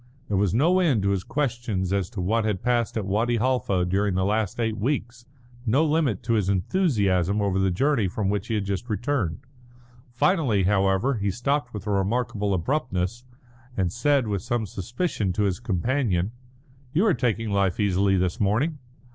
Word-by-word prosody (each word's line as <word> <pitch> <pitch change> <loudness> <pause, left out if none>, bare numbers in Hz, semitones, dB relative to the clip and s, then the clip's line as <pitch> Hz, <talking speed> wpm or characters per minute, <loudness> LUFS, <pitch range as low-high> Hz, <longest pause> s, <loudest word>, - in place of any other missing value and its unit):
There 100 - +1
was 100 -2 +2
no 165 - +3
end 140 - +2
to 100 - +2
his 95 -2 -1
questions 115 -9 -2
as 100 -3 0
to 110 -6 -5
what 110 +5 +1
had 105 -4 -2
passed 120 -2 0
at 105 - -2
Wadi 115 +5 +1
Halfa 115 -7 +1
during 95 +1 0
the 95 0 +1
last 105 0 -1
eight 110 -2 0
weeks, 120 -1 -2 0.4
no 130 +7 +2
limit 150 - +1
to 115 - 0
his 105 -4 +1
enthusiasm 100 - +1
over 100 -2 +1
the 95 0 +2
journey 120 +3 +1
from 95 +2 -2
which 105 +2 -1
he 115 - -1
had 105 -2 -1
just 100 +5 -3
returned. 110 - -1 0.7
Finally, 125 - +2
however, 95 +6 +2
he 100 0 0
stopped 140 +9 -1
with 105 -3 -7
a 105 - -1
remarkable 105 +1 0
abruptness, 120 - -2 0.5
and 90 -2 0
said, 140 +1 +2
with 100 -3 -2
some 120 -2 -1
suspicion, 105 - -2
to 105 - 0
his 95 -3 0
companion: 110 -2 0 0.6
"You 175 +8 +3
are 205 - +4
taking 115 -5 -1
life 100 -1 +1
easily 100 -1 +2
this 90 +5 -1
morning." 120 +10 +1
105 Hz, 180 wpm, -25 LUFS, 95-125 Hz, 0.7 s, are